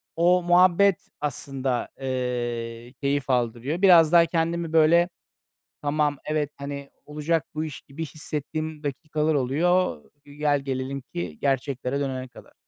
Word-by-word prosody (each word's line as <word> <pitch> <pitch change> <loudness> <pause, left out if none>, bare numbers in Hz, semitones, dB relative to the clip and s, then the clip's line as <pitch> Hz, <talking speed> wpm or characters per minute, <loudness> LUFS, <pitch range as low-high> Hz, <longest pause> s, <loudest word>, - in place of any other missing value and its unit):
o 175 +2 +4
muhabbet 180 +2 +4
aslında, 135 -2 -2
eee, 120 -2 -3
keyif 140 -1 0
aldırıyor. 125 +6 0
Biraz 170 -5 +7
daha 170 -1 +7
kendimi, 165 0 -1
böyle, 165 +2 +5 0.7
tamam, 145 0 +1
evet, 150 -1 -1
hani, 140 0 -6 0.2
olacak 150 +1 -1
bu 155 +1 -2
iş 155 -3 -7
gibi 150 +4 -7
hissettiğim 155 +1 -5
dakikalar 150 +2 -1
oluyor, 145 - +1 0.2
gel 145 0 0
gelelim 135 0 -3
ki 85 -3 -4
gerçeklere 135 -1 -1
dönene 130 -2 -3
kadar. - - -16
145 Hz, 125 wpm, -25 LUFS, 130-160 Hz, 0.7 s, Biraz